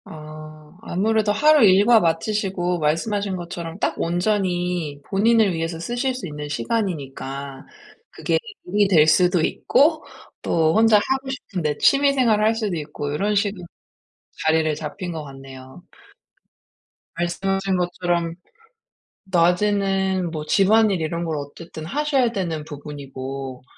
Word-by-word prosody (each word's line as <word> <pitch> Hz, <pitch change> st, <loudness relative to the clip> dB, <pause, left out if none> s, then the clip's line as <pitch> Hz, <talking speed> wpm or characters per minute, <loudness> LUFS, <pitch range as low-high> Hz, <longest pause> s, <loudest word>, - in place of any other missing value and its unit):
아. 155 Hz, 0 st, -11 dB
아무래도 215 Hz, +3 st, +1 dB
하루 300 Hz, +6 st, +5 dB
일과 205 Hz, +4 st, +6 dB
마치시고 180 Hz, 0 st, -1 dB
말씀하신 190 Hz, +6 st, -1 dB
것처럼 170 Hz, -1 st, -6 dB
딱 -, -, 0 dB
온전히 175 Hz, -4 st, -1 dB
본인을 215 Hz, +1 st, +3 dB
위해서 165 Hz, 0 st, -3 dB
쓰실 245 Hz, +7 st, -2 dB
수 220 Hz, -8 st, -6 dB
있는 150 Hz, -1 st, -7 dB
시간이니까 140 Hz, -, -4 dB, 0.4 s
그게 -, -, -1 dB, 0.3 s
일이 205 Hz, +2 st, +2 dB
될 165 Hz, -6 st, +5 dB
수도 175 Hz, +2 st, +4 dB
있고 305 Hz, -, +2 dB, 0.4 s
또 160 Hz, -1 st, +2 dB
혼자 220 Hz, -1 st, +6 dB
하고 265 Hz, +5 st, -1 dB
싶은 220 Hz, -8 st, -5 dB
데 150 Hz, -2 st, -1 dB
취미 280 Hz, 0 st, +4 dB
생활을 230 Hz, -6 st, +2 dB
할 220 Hz, +1 st, +3 dB
수도 215 Hz, -5 st, -2 dB
있고 150 Hz, -1 st, -5 dB
요런 205 Hz, +7 st, 0 dB
식으로 200 Hz, -2 st, -1 dB, 0.8 s
자리를 160 Hz, 0 st, +3 dB
잡힌 160 Hz, +4 st, -6 dB
것 160 Hz, -2 st, -5 dB
같네요. 135 Hz, +2 st, -12 dB, 1.3 s
말씀하신 195 Hz, +3 st, -1 dB
것처럼 175 Hz, -1 st, -1 dB, 0.9 s
낮에는 190 Hz, 0 st, +1 dB
뭐 155 Hz, -2 st, -5 dB
집안일 200 Hz, +1 st, +3 dB
이런 170 Hz, +2 st, -2 dB
걸 160 Hz, -2 st, -2 dB
어쨌든 155 Hz, +2 st, -8 dB
하셔야 275 Hz, -, +1 dB
되는 170 Hz, -8 st, -3 dB
부분이고 135 Hz, -3 st, -7 dB
175 Hz, 280 characters per minute, -22 LUFS, 155-210 Hz, 1.3 s, 일과